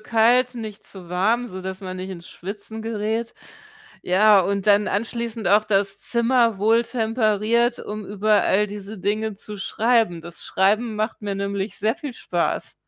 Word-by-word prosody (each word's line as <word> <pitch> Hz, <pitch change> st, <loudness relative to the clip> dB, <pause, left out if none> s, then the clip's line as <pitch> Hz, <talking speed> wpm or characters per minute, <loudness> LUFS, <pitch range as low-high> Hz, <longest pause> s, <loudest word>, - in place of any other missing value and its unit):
kalt, 240 Hz, +3 st, +3 dB
nicht 220 Hz, -3 st, -7 dB
zu 185 Hz, -3 st, -12 dB
warm, 220 Hz, +7 st, +1 dB
sodass 190 Hz, 0 st, -6 dB
man 185 Hz, -1 st, -6 dB
nicht 185 Hz, +1 st, -6 dB
ins 175 Hz, -2 st, -9 dB
Schwitzen 205 Hz, +4 st, -7 dB
gerät. 225 Hz, +1 st, -2 dB, 0.7 s
Ja, 205 Hz, +3 st, +5 dB
und 200 Hz, +1 st, -1 dB
dann 205 Hz, 0 st, +5 dB
anschließend 225 Hz, -1 st, -2 dB
auch 210 Hz, +2 st, +5 dB
das 200 Hz, -1 st, 0 dB
Zimmer 235 Hz, -2 st, +2 dB
wohltemperiert, 225 Hz, +1 st, +1 dB
um 210 Hz, -1 st, -6 dB
über 210 Hz, +1 st, +2 dB
all 210 Hz, +2 st, +2 dB
diese 205 Hz, 0 st, -8 dB
Dinge 215 Hz, +2 st, -1 dB
zu 210 Hz, +1 st, -9 dB
schreiben. 220 Hz, -4 st, +1 dB
Das 170 Hz, 0 st, -11 dB
Schreiben 215 Hz, +4 st, +1 dB
macht 215 Hz, +1 st, -2 dB
mir 200 Hz, -1 st, -2 dB
nämlich 200 Hz, +1 st, -3 dB
sehr 220 Hz, +2 st, 0 dB
viel 290 Hz, -7 st, -7 dB
Spaß. -, -, -2 dB
215 Hz, 155 wpm, -23 LUFS, 195-230 Hz, 0.7 s, Ja